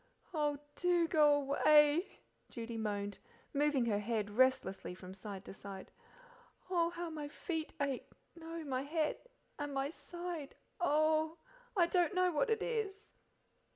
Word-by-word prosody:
"Oh, 295 Hz, -2 st, +1 dB, 0.2 s
DO 350 Hz, -2 st, +3 dB
go 300 Hz, -3 st, +6 dB
away,": 295 Hz, +5 st, +4 dB, 0.3 s
Judy 230 Hz, 0 st, -5 dB
moaned, 205 Hz, -2 st, -2 dB, 0.3 s
moving 285 Hz, -3 st, +3 dB
her 210 Hz, -3 st, +1 dB
head 210 Hz, -1 st, -1 dB
restlessly 225 Hz, -6 st, +2 dB
from 185 Hz, 0 st, -9 dB
side 195 Hz, 0 st, -7 dB
to -, -, -8 dB
side. 195 Hz, -1 st, -9 dB, 0.8 s
"Oh, 340 Hz, -2 st, +3 dB
how 345 Hz, -1 st, -5 dB
my 300 Hz, -2 st, -4 dB
feet 320 Hz, +1 st, -4 dB
ache! 280 Hz, -3 st, -1 dB, 0.3 s
no 330 Hz, 0 st, -6 dB
my 260 Hz, -3 st, -1 dB
head, 305 Hz, +2 st, 0 dB, 0.4 s
and 290 Hz, -1 st, -3 dB
my 270 Hz, +2 st, 0 dB
side 345 Hz, -4 st, -6 dB, 0.2 s
oh! 315 Hz, 0 st, +3 dB, 0.4 s
I 345 Hz, -, +6 dB
don't 355 Hz, +2 st, +2 dB
know 365 Hz, 0 st, +4 dB
what 335 Hz, +9 st, +1 dB
it 450 Hz, -, +1 dB
is!" 435 Hz, -3 st, -2 dB
295 Hz, 140 wpm, -35 LUFS, 240-340 Hz, 0.8 s, go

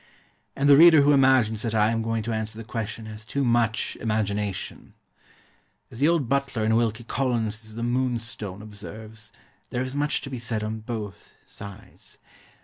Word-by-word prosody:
And 140 Hz, -, +1 dB
the 140 Hz, -1 st, +8 dB
reader 160 Hz, -2 st, +8 dB
who 145 Hz, -, +5 dB
imagines 130 Hz, -6 st, +4 dB
that 115 Hz, -1 st, -2 dB
I 105 Hz, +1 st, +4 dB
am 115 Hz, 0 st, 0 dB
going 115 Hz, 0 st, -1 dB
to 115 Hz, +1 st, -2 dB
answer 110 Hz, 0 st, -4 dB
the 115 Hz, -, -6 dB
question 115 Hz, 0 st, -5 dB
has 110 Hz, 0 st, -9 dB
too 140 Hz, +5 st, -2 dB
much 115 Hz, -2 st, +1 dB
imagination. 105 Hz, -3 st, -2 dB, 1.0 s
As 115 Hz, -, -9 dB
the 145 Hz, -, +4 dB
old 165 Hz, -6 st, +2 dB
butler 140 Hz, -4 st, 0 dB
in 110 Hz, +1 st, +3 dB
Wilkie 115 Hz, 0 st, +1 dB
Collins's 110 Hz, -4 st, -2 dB
The 115 Hz, -, -4 dB
Moonstone 115 Hz, -5 st, -2 dB
observes, 110 Hz, +1 st, -10 dB, 0.4 s
there 125 Hz, -, -1 dB
is 130 Hz, 0 st, -5 dB
much 145 Hz, +1 st, +1 dB
to 135 Hz, -, -8 dB
be 130 Hz, -, -4 dB
said 115 Hz, -2 st, -2 dB
on 110 Hz, +1 st, -3 dB
both 110 Hz, -3 st, -7 dB
sides. 100 Hz, -1 st, -11 dB
115 Hz, 170 wpm, -25 LUFS, 110-130 Hz, 1.0 s, the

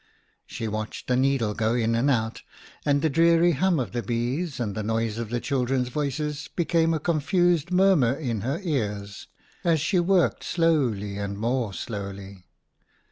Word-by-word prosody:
She 115 Hz, -, -5 dB
watched 110 Hz, 0 st, -5 dB
the 125 Hz, -, +1 dB
needle 130 Hz, -4 st, +1 dB
go 110 Hz, +2 st, 0 dB
in 115 Hz, -1 st, +1 dB
and 120 Hz, +5 st, +2 dB
out; 110 Hz, -4 st, 0 dB, 0.5 s
and 145 Hz, 0 st, +2 dB
the -, -, +4 dB
dreary 170 Hz, +3 st, +4 dB
hum 170 Hz, +2 st, +1 dB
of 125 Hz, -, -3 dB
the 120 Hz, -, -2 dB
bees 125 Hz, -, -2 dB
and 110 Hz, -4 st, -2 dB
the 110 Hz, -, -3 dB
noise 110 Hz, +1 st, -1 dB
of 115 Hz, -2 st, -4 dB
the 120 Hz, +1 st, -1 dB
children's 125 Hz, -1 st, 0 dB
voices 150 Hz, +2 st, -3 dB
became 165 Hz, -1 st, +2 dB
a -, -, -1 dB
confused 170 Hz, +1 st, +1 dB
murmur 180 Hz, -9 st, +4 dB
in 120 Hz, -8 st, -3 dB
her 135 Hz, +8 st, -2 dB
ears, 105 Hz, -, -3 dB, 0.4 s
as 165 Hz, -2 st, +3 dB
she 175 Hz, +5 st, +1 dB
worked 175 Hz, -, +2 dB
slowly 125 Hz, -, 0 dB
and 100 Hz, 0 st, -4 dB
more 115 Hz, 0 st, -1 dB
slowly. 100 Hz, -1 st, -7 dB
130 Hz, 165 wpm, -25 LUFS, 110-160 Hz, 0.5 s, the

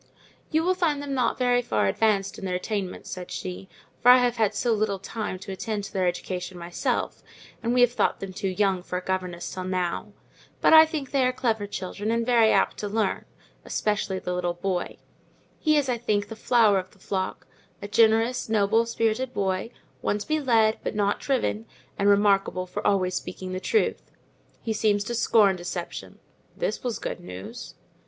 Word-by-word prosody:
"You 315 Hz, 0 st, +1 dB
will 365 Hz, +2 st, +3 dB
find 325 Hz, -6 st, 0 dB
them 285 Hz, -1 st, -4 dB
not 255 Hz, -3 st, +1 dB
very 245 Hz, -1 st, +3 dB
far 240 Hz, -, 0 dB
advanced 200 Hz, -3 st, +1 dB
in 195 Hz, -, -6 dB
their 180 Hz, -1 st, -1 dB
attainments," 190 Hz, 0 st, -4 dB
said 180 Hz, -1 st, -6 dB
she, 185 Hz, +1 st, -6 dB, 0.3 s
"for 245 Hz, -, +6 dB
I 250 Hz, -, +10 dB
have 245 Hz, -1 st, +1 dB
had 215 Hz, -2 st, +1 dB
so 235 Hz, +3 st, +1 dB
little 210 Hz, -2 st, 0 dB
time 205 Hz, 0 st, -5 dB
to 190 Hz, +1 st, -8 dB
attend 205 Hz, +2 st, -3 dB
to -, -, -8 dB
their 185 Hz, -2 st, +1 dB
education 180 Hz, +1 st, -4 dB
myself, 175 Hz, 0 st, -2 dB, 0.4 s
and 235 Hz, -, -1 dB
we 250 Hz, 0 st, +3 dB
have 245 Hz, -1 st, +5 dB
thought -, -, 0 dB
them 195 Hz, -1 st, -6 dB
too 195 Hz, +1 st, -3 dB
young 190 Hz, -1 st, +1 dB
for 180 Hz, 0 st, -4 dB
a 180 Hz, -, -5 dB
governess 180 Hz, -2 st, -3 dB
till 185 Hz, -, -4 dB
now; 185 Hz, -2 st, -2 dB, 0.5 s
but -, -, +4 dB
I 315 Hz, 0 st, +9 dB
think 300 Hz, -5 st, -5 dB
they 275 Hz, -2 st, +2 dB
are 255 Hz, -, +3 dB
clever 225 Hz, -5 st, -1 dB
children, 200 Hz, +2 st, -4 dB
and 230 Hz, 0 st, +1 dB
very 230 Hz, -3 st, +5 dB
apt -, -, +2 dB
to 210 Hz, -, -3 dB
learn, 210 Hz, -1 st, -1 dB, 0.4 s
especially 210 Hz, -2 st, -1 dB
the 180 Hz, -1 st, -3 dB
little 175 Hz, -1 st, -1 dB
boy; 180 Hz, 0 st, -3 dB, 0.6 s
he 310 Hz, -1 st, +3 dB
is, 285 Hz, -2 st, +1 dB
I 245 Hz, -2 st, -1 dB
think, 205 Hz, -3 st, 0 dB
the 225 Hz, -, -6 dB
flower 220 Hz, -3 st, +4 dB
of 185 Hz, 0 st, -7 dB
the 210 Hz, -, -23 dB
flock—a 190 Hz, 0 st, -6 dB
generous, 225 Hz, +3 st, +3 dB
noble 220 Hz, +2 st, +3 dB
spirited 230 Hz, +2 st, -1 dB
boy, 190 Hz, +2 st, -1 dB, 0.3 s
one 205 Hz, -, 0 dB
to 210 Hz, -, -7 dB
be 310 Hz, 0 st, +1 dB
led, 225 Hz, -5 st, +3 dB
but -, -, -3 dB
not 205 Hz, -1 st, +1 dB
driven, 240 Hz, -5 st, -1 dB, 0.3 s
and 200 Hz, +1 st, +2 dB
remarkable 200 Hz, -2 st, +3 dB
for 180 Hz, -, -5 dB
always 185 Hz, -2 st, +2 dB
speaking 185 Hz, +1 st, -5 dB
the 185 Hz, -, -2 dB
truth. 440 Hz, -, +1 dB, 0.6 s
He 225 Hz, -, -1 dB
seems 205 Hz, -1 st, +2 dB
to 240 Hz, -, -4 dB
scorn 220 Hz, -4 st, +4 dB
deception" 175 Hz, 0 st, -6 dB, 0.4 s
(this -, -, -2 dB
was 245 Hz, -3 st, -2 dB
good -, -, -5 dB
news). 90 Hz, +2 st, -9 dB
205 Hz, 190 wpm, -26 LUFS, 185-235 Hz, 0.6 s, I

